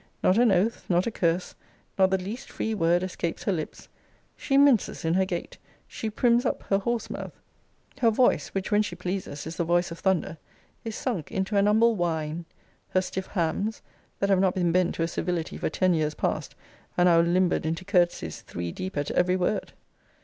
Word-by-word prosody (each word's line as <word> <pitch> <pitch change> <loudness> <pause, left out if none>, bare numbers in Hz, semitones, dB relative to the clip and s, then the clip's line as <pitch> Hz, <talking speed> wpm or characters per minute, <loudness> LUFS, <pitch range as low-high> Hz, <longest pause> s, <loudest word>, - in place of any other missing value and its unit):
Not 185 +5 +4
an 240 -3 +5
oath, 195 +5 +1
not 175 0 +3
a 235 - -1
curse, 175 -3 0 0.4
nor 190 -1 +5
the 190 0 +1
least 200 +7 -6
free 220 - -2
word, 175 -2 +2
escapes 175 -2 -3
her - - +1
lips. 160 -5 -5 0.5
She 275 - 0
minces 275 -12 +3
in 160 - +2
her 190 +1 +3
gait. 175 -2 -5 0.3
She 220 - -4
prims 235 +2 +3
up 250 - -1
her 195 - +1
horse 235 +3 -2
mouth. - - -7 0.6
Her 230 - +5
voice, 245 +3 +3
which, 195 +2 -4
when 210 0 +4
she 205 -4 -3
pleases, 180 -5 -4
is 160 +1 -6
the - - +1
voice 175 +1 +1
of 170 - -7
thunder, 180 -4 0 0.4
is 225 -2 -5
sunk 210 - -3
into 190 +2 -2
an 200 0 +4
humble 225 +2 +4
whine. 165 -2 -2 0.4
Her 185 - +2
stiff 185 +1 -4
hams, 195 +4 -2 0.4
that 200 - +1
have 190 - +4
not 190 -1 +2
been 175 -2 +1
bent 180 0 +2
to 165 - -1
a - - +1
civility 170 -1 -3
for - - -1
ten 185 +3 +2
years 155 -2 0
past, - - -2 0.4
are 175 - +4
now 170 -2 +6
limbered 175 +1 +2
into 165 +3 -3
courtesies 175 - +1
three 85 0 -5
deep 185 - -6
at 145 0 -1
ever 180 +1 +2
word. 185 +4 -1
185 Hz, 200 wpm, -26 LUFS, 170-205 Hz, 0.6 s, now